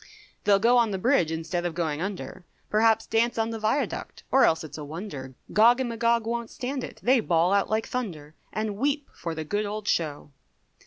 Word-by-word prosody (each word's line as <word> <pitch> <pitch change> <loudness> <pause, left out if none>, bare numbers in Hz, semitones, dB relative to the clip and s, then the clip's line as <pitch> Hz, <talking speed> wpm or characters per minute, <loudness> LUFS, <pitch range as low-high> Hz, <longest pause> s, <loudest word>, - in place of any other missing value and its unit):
They 200 -1 +6
go 235 +4 +4
on 230 -2 +3
the 195 - -2
bridge 190 - +2
instead 165 +2 -2
of 175 -2 -3
going 160 -3 -1
under, 190 -1 -5 0.3
Perhaps 220 +1 +3
dance 230 +2 +1
on 225 0 0
the 225 - -4
viaduct, 220 +7 -2
or 270 - +6
else 160 - +2
it's 155 0 -8
a - - -5
wonder, 145 -4 -7 0.2
Gog 235 +4 +6
and 255 -2 -1
Magog 230 0 +1
won't 235 0 -2
stand 260 +1 -4
it, - - -8
they 255 +1 +5
bawl 175 -3 +2
out 200 -1 +2
like 220 +1 0
thunder, 165 -12 -5 0.2
And 215 -2 -3
weep 285 +3 -1
for 165 -1 -5
the 160 - -3
good 205 +6 -1
old 210 0 -5
show. 150 -5 -1
215 Hz, 205 wpm, -26 LUFS, 170-235 Hz, 0.3 s, They